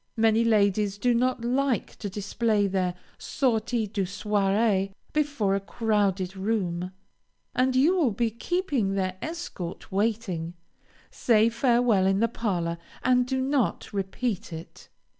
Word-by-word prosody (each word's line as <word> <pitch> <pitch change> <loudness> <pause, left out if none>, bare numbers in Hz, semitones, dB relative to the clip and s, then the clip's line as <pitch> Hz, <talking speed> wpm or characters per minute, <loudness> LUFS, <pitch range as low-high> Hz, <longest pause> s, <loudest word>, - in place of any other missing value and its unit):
Many 225 0 +4
ladies 205 -2 +2
do 245 +4 +2
not 245 0 0
like 260 0 0
to 205 - -5
display 205 +2 0
their 185 -2 0 0.2
"sortie 235 -3 0
du 205 0 -3
soirée" 195 0 +1 0.2
before 285 -10 +1
a 195 - +1
crowded 200 -3 0
room, 185 -3 -2 0.6
and 255 +1 +2
you 300 +8 +4
will 310 -8 +3
be 225 +2 -1
keeping 250 - -1
their 185 -1 -1
escort 310 - -6
waiting. 195 -5 -1 0.6
Say 225 -1 +3
farewell 235 -4 +3
in 195 0 +2
the 230 - +3
parlor, 175 -8 -2 0.2
and 250 -1 +3
do 260 0 -1
not 265 -5 0
repeat 200 +1 -3
it. 165 0 -10
215 Hz, 130 wpm, -26 LUFS, 195-245 Hz, 0.6 s, Many